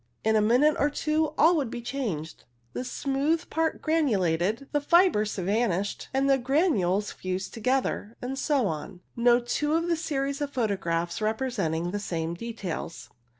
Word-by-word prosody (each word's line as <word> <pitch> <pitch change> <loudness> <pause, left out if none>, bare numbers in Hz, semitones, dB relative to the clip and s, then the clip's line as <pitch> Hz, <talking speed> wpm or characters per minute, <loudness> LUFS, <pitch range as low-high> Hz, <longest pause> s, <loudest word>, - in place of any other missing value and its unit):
In 220 0 +2
a 215 - +4
minute 250 +8 +4
or 290 - +3
two 305 +1 0
all 330 +4 +6
would 275 -6 -1
be 240 - -5
changed 230 - -4
— 120 0 -40
the - - -3
smooth 280 +6 -1
part 320 -1 -1
granulated, 215 - +1
the 290 - +1
fibres 300 - +3
vanished, 200 0 -1
and 270 +1 +1
the 270 -1 +4
granules 240 - +1
fused 185 +1 -4
together, 235 -2 -1
and 255 +2 -4
so 280 -6 +1
on, 165 +2 -4
no 240 0 +4
two 295 +5 -1
of 330 - +2
a - - +3
series 280 -3 -2
of 290 - -1
photographs 190 -8 -1
representing 215 -8 -1
the 205 - -2
same 165 -4 -3
details. 190 -5 -6
235 Hz, 160 wpm, -27 LUFS, 190-280 Hz, -, all